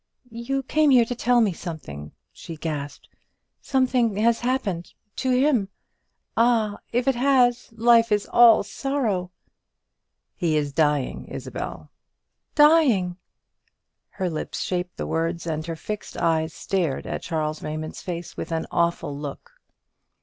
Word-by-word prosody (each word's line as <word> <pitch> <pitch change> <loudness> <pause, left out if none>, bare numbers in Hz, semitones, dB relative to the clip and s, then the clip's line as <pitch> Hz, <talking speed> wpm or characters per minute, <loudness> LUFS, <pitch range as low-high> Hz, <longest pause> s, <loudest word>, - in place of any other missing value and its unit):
"You 235 +4 -3
came 305 +3 +2
here 250 -3 +6
to 245 - -3
tell 245 0 +2
me 205 -5 +2
something!" 75 - -8 0.2
she 165 - -9
gasped; 145 -3 -5 0.5
"something 255 -5 +1
has 230 +2 +2
happened 220 -9 -2 0.2
to 260 - -1
him! 250 -5 +2 0.7
Ah, 225 -3 +2
if 245 +2 0
it 270 - +4
has, 245 -2 +2
life 230 0 +4
is 205 -1 +2
all 235 -2 +6
sorrow!" 220 -7 -2 1.0
"He 160 -3 0
is 145 -2 -1
dying, 150 -3 0
Isabel." - - -7 0.6
"Dying!" 280 - +4 0.9
Her 185 - -3
lips 160 -3 -4
shaped 180 -1 -3
the - - -3
words, 165 +1 -2
and 155 -2 -2
her 165 - -3
fixed 210 +5 -6
eyes 160 -1 +1
stared 170 -8 -2
at - - -4
Charles 155 -2 -2
Raymond's 155 +1 -5
face 175 -2 -6
with - - -6
an 160 -1 -1
awful 170 -4 0
look. 145 - -7
195 Hz, 135 wpm, -24 LUFS, 165-245 Hz, 1.0 s, here